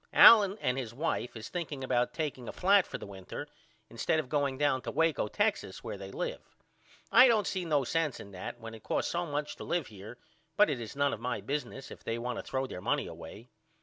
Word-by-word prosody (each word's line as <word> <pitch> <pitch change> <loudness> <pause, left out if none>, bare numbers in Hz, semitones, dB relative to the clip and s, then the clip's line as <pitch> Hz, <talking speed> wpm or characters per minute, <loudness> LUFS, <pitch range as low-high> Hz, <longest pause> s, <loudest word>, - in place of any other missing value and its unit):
Allen 205 -3 +9
and 125 +1 0
his 120 -3 -6
wife 125 -3 -2
is 110 - -8
thinking 155 -6 -4
about 125 -1 +1
takeing 145 -6 -4
a - - -3
flat 195 +1 +4
for - - -5
the - - -8
winter 100 +8 -8 0.4
instead 115 +7 0
of 150 - -4
going 140 -3 0
down 145 -2 +2
to - - -5
Waco 160 -8 +1
Texas - - -1
where - - -5
they 95 -1 -8
live. - - -4 0.7
I 250 +3 +9
don't 220 -4 +3
see 185 -2 -2
no 150 -4 +2
sense 155 +1 -1
in 100 - -10
that 95 +5 -7
when 115 -1 -8
it 110 - -10
costs - - -1
so 175 0 -1
much 145 0 -3
to - - -7
live 175 -4 -1
here 105 +5 -10 0.4
but 210 -6 +6
it 125 -4 -3
is 115 - -7
none 140 0 +2
of - - -5
my 125 +2 -2
business 135 -1 -4
if - - -11
they 115 - -2
want 120 0 -3
to - - -6
throw 135 0 -2
their 90 -8 -7
money 140 +7 0
away. 85 +8 -10
135 Hz, 230 wpm, -31 LUFS, 115-160 Hz, 0.7 s, Allen